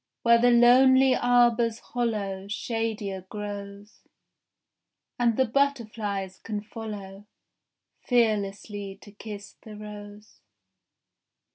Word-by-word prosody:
Where 235 0 +6
the 245 +1 +4
lonely 255 +2 +6
arbour's 240 -2 +3
hollow 210 -6 -3
Shadier 215 -2 -3
grows, 205 0 -8 1.2
And 235 -2 +2
the 260 - +4
butterflies 220 -7 -1
can 210 -2 -5
follow 205 -3 -8 0.8
Fearlessly 205 -4 0
to 205 - -14
kiss 205 -1 -10
the 215 -1 -11
rose. 210 0 -11
215 Hz, 90 wpm, -26 LUFS, 205-235 Hz, 1.2 s, Where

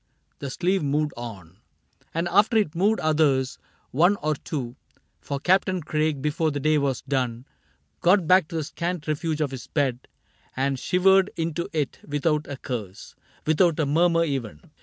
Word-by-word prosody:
The 140 - -5
sleeve 185 +7 0
moved 150 +1 0
on, 100 -7 -9 0.5
And 165 +2 -1
after 210 +5 +4
it 200 -8 +1
moved 200 +6 +2
others 150 -4 +2 0.2
— - - -37
one 175 +9 +4
or 155 0 +2
two; 135 -4 -5 0.4
For 140 - -4
Captain 185 +1 +2
Craig, 150 -2 -1
before 155 +2 +1
the 145 -1 -3
day 155 +1 +2
was 140 -3 -1
done. 125 -3 -2 0.5
Got 180 0 +4
back 185 -1 +5
to 165 - -8
the 160 - -1
scant 170 +1 -4
refuge 155 +1 -1
of 145 -3 0
his 130 -3 -7
bed 135 -4 -1 0.5
And 135 0 0
shivered 190 +4 +4
into 165 +1 -2
it 150 -4 -2
without 150 +1 -1
a 140 - -6
curse 110 -9 -6 0.2
— - - -32
Without 165 +1 +3
a 155 - +2
murmur 165 +3 +3
even. 130 - -4
150 Hz, 170 wpm, -25 LUFS, 135-170 Hz, 0.5 s, back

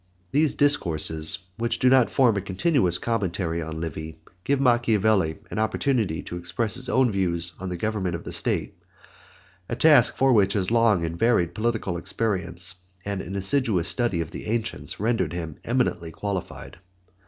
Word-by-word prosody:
These 150 +3 +2
Discourses, 80 - +2 0.2
which 115 +1 0
do 130 - +2
not 130 -2 +5
form 125 -5 +3
a 100 - -1
continuous 95 - +1
commentary 95 -7 -2
on 80 0 -5
Livy, 80 0 -6 0.3
give 140 +4 +1
Machiavelli 110 - +2
an 110 - -3
opportunity 110 - 0
to 90 - -6
express 90 +6 -2
his 130 0 -2
own 130 -3 +3
views 85 -3 -1
on 95 0 -5
the 90 - -4
government 100 -3 -2
of 85 - -7
the - - -6
state, - - -2 0.9
a - - -2
task 135 -2 +5
for 135 -1 +4
which 100 -3 +3
his 95 0 -1
long 115 -7 +3
and 85 +1 -5
varied 115 -8 +2
political 110 -5 -1
experience, 90 -1 -2 0.3
and 100 -1 -3
an 95 +3 -7
assiduous 100 -3 +1
study 120 -9 0
of 80 0 -6
the - - -8
ancients 115 0 -3
rendered 115 -2 0
him 80 -4 -5
eminently 115 -9 -1
qualified. 95 -1 -6
100 Hz, 165 wpm, -25 LUFS, 85-120 Hz, 0.9 s, not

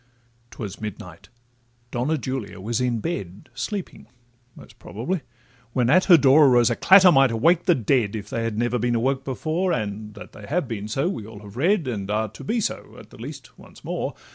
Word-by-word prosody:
'Twas 105 -4 -8
midnight—Donna 120 - -6
Julia 130 -8 -5
was 115 +5 -2
in 120 -3 0
bed, 100 - -5
Sleeping, 180 - -5 0.5
most - - -16
probably,—when 125 - -4
at 185 +4 +5
her 175 -4 +8
door 140 +1 +6
Arose 120 -2 +4
a - - 0
clatter 190 +4 +7
might 135 -3 +5
awake 165 +10 +2
the 175 -3 +4
dead, 115 -3 +1
If 105 - -6
they 115 - -2
had 115 -2 -3
never 120 +1 0
been 120 +1 0
awoke 130 +3 0
before, 160 +7 -2
And 105 -4 -4
that 105 - -11
they 105 - -12
have 160 -1 -1
been 105 -3 -5
so 135 +9 -1
we 115 - -4
all 110 -2 -11
have 100 0 -12
read, 170 - +1
And 100 -5 -4
are 110 +1 0
to 110 - -12
be 230 +2 -1
so, 215 - -4
at - - -14
the - - -14
least, - - -10
once - - -16
more. - - -4
120 Hz, 190 wpm, -23 LUFS, 110-145 Hz, 0.5 s, her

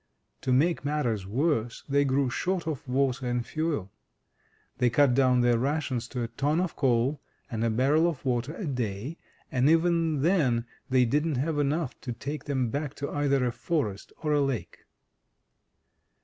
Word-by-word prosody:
To 130 - -1
make 155 +6 +2
matters 125 -10 -1
worse, 120 0 0
they 140 0 +3
grew 135 -1 +1
short 180 +5 -1
of 155 -4 -4
water 130 0 0
and 120 -1 -1
fuel. 145 - -2 0.9
They 125 - +4
cut 135 +2 +4
down 130 -1 +4
their 120 -1 +3
rations 135 -3 -1
to 125 -1 -3
a - - -2
ton 145 +7 0
of 180 -2 -1
coal 130 +2 +1 0.3
and 115 -1 -2
a 115 - +2
barrel 140 +9 +3
of 155 -5 -4
water 125 +4 -1
a 205 - -5
day, 125 - -3 0.3
and 130 0 +3
even 165 -3 +2
then 140 -10 +2 0.2
they 130 -1 +4
didn't 150 +5 +1
have 145 +4 -1
enough 145 0 -1
to 125 - -4
take 135 +4 -6
them 130 -5 -1
back 145 0 -3
to 140 - -4
either 140 -3 +1
a 120 - +1
forest 115 - -2
or 150 -1 +1
a 145 - +3
lake. 125 -11 -3
135 Hz, 170 wpm, -28 LUFS, 120-150 Hz, 0.9 s, They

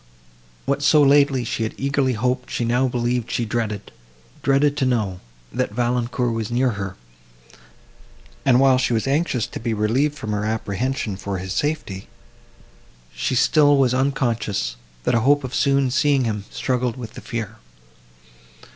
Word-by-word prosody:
What 140 +1 0
so 150 +1 +5
lately 140 -2 +4
she 115 - -3
had 110 - -2
eagerly 135 -1 +1
hoped 125 +3 -1
she 120 - -2
now 125 +3 +2
believed 120 -1 -1
she 120 - -1
dreaded;—dreaded 110 - -2
to 135 - +1
know, 105 -7 0 0.3
that 125 +1 -1
Valancourt 120 0 0
was 110 -2 -3
near 125 +1 +1
her; 100 -3 -5 1.5
and, 125 -2 +4
while 135 -1 +5
she 125 -2 +1
was 110 - 0
anxious 135 -4 0
to - - -7
be 115 -1 -2
relieved 130 +8 +1
from 110 -5 -5
her 105 0 -1
apprehension 110 0 -2
for 100 0 -4
his 95 +1 -5
safety, 105 -6 -2 1.1
she 130 - -1
still 145 +2 +4
was 130 -2 +3
unconscious, 120 - 0 0.3
that - - +1
a 120 - +4
hope 145 +5 +3
of 130 0 -6
soon 140 -2 +2
seeing 140 0 +2
him, 105 -4 -2
struggled 125 -2 -1
with 115 -4 -8
the - - -9
fear. 115 -2 -5
125 Hz, 155 wpm, -22 LUFS, 110-135 Hz, 1.5 s, so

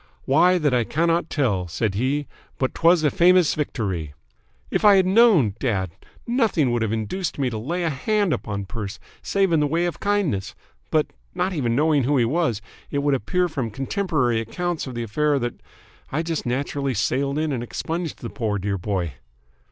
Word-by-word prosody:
'Why, 175 +6 +4
that 150 -6 +1
I 120 -1 +3
cannot 165 +6 0
tell,' 105 - 0
said 100 +4 -1
he, 135 +8 0 0.3
'but 130 - -1
'twas 165 0 +4
a 150 - +3
famous 180 -1 +5
victory!' 95 - -3 0.6
If - - 0
I 205 -1 +8
had 190 -1 +4
known, 190 - +5
dad, 95 -9 -1 0.3
nothing 225 - +2
would 120 -1 0
have 110 -2 0
induced 115 - -3
me 135 -3 0
to 110 - -3
lay 170 +10 -2
a 165 - 0
hand 200 +6 +1
upon 100 -2 -4
Perce, 100 -1 -6 0.2
save 195 -2 +1
in 165 - +4
the 150 - +2
way 165 +4 +1
of 175 -3 -3
kindness, 200 - -1 0.3
but, - - +2 0.3
not 185 +1 0
even 120 -8 0
knowing 150 -1 +3
who 145 +2 +2
he 120 - +3
was, 120 -5 0 0.3
it 140 -1 -1
would 145 -1 +2
appear 180 - +1
from 135 -8 -3
contemporary 135 - 0
accounts 170 - -3
of 130 - -7
the 120 - -2
affair 145 +6 +1
that 120 -2 -4 0.5
I 155 +4 0
just 165 -5 -3
naturally 135 +1 -1
sailed 140 +6 0
in 155 0 0
and 125 -4 -2
expunged 165 +7 -4
the - - -5
poor, 110 -5 -1
dear 100 0 -2
boy!" 90 -5 -2
140 Hz, 190 wpm, -23 LUFS, 115-170 Hz, 0.6 s, I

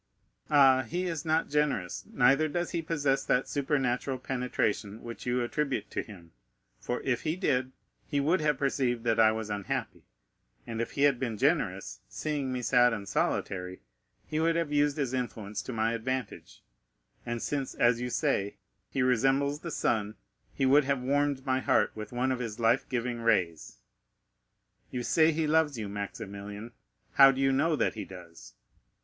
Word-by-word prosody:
Ah, 135 -3 +6
he 175 +7 -3
is 165 -3 -3
not 160 +1 +1
generous, 145 -12 0
neither 135 +5 +4
does 175 +3 -2
he 170 - -1
possess 145 -4 0
that 125 - +1
supernatural 135 -2 -1
penetration 125 -5 -2
which 120 +1 -8
you 125 0 +1
attribute 140 +3 -2
to - - -1
him, 85 -6 -13 0.5
for 125 - -3
if 125 -3 -1
he 155 +1 -1
did, 130 -8 0 0.4
he 145 - 0
would 160 +6 +2
have 150 -2 +1
perceived 130 -4 0
that 115 -2 +1
I 110 -1 +6
was 110 -1 -4
unhappy; 100 -2 -3 0.6
and 115 -1 -4
if 115 - -4
he 140 - 0
had 140 -4 +4
been 115 -4 -2
generous, - - 0
seeing 135 - -3
me 125 -1 -3
sad 125 -1 +4
and 100 -3 -5
solitary, 90 -1 -2 0.4
he 155 - -2
would 165 +1 +2
have 165 -3 -1
used 145 0 +2
his 135 -4 -1
influence 110 -5 -3
to - - -7
my 115 0 0
advantage, 125 0 -4 0.6
and 120 -1 -3
since, 140 +2 -3
as 120 0 +3
you 125 - -2
say, 125 -8 0 0.3
he 135 - 0
resembles 135 +4 +2
the 170 - -6
sun, 110 -8 -1 0.4
he 135 - -1
would 140 +2 +5
have 135 -2 0
warmed 140 0 0
my 130 0 +1
heart - - +2
with 105 -1 -7
one 125 +2 0
of 130 - -1
his 115 -2 -5
life 115 +3 +2
giving 120 -1 -2
rays. 90 -9 0 1.1
You 125 -1 -4
say 160 +5 +4
he 160 0 0
loves 155 -3 +2
you, 110 -2 -4
Maximilian; 100 +2 -6 0.4
how 135 0 +8
do 135 - -5
you 135 0 +3
know 155 +4 +2
that 135 - +1
he 110 - -5
does? 85 -9 -12
130 Hz, 175 wpm, -29 LUFS, 115-145 Hz, 1.1 s, how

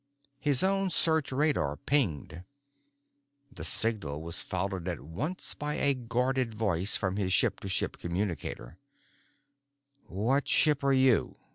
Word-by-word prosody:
His 145 -1 +2
own 195 0 +2
search 160 -4 +2
radar 130 - 0
pinged. 90 - -1 1.1
The - - -9
signal 100 -8 0
was 85 0 -5
followed 95 -1 -3
at 90 -2 -3
once 125 - -4
by 150 0 -4
a 140 0 +2
guarded 125 -1 -1
voice 100 -3 +1
from 95 0 -2
his 95 -2 -1
ship 105 +2 +2
to - - -7
ship 95 - -1
communicator: 85 -8 -4 1.3
"What 120 +9 0
ship 150 -2 +3
are 140 - +3
you? 130 -3 +3
115 Hz, 130 wpm, -29 LUFS, 90-140 Hz, 1.3 s, ship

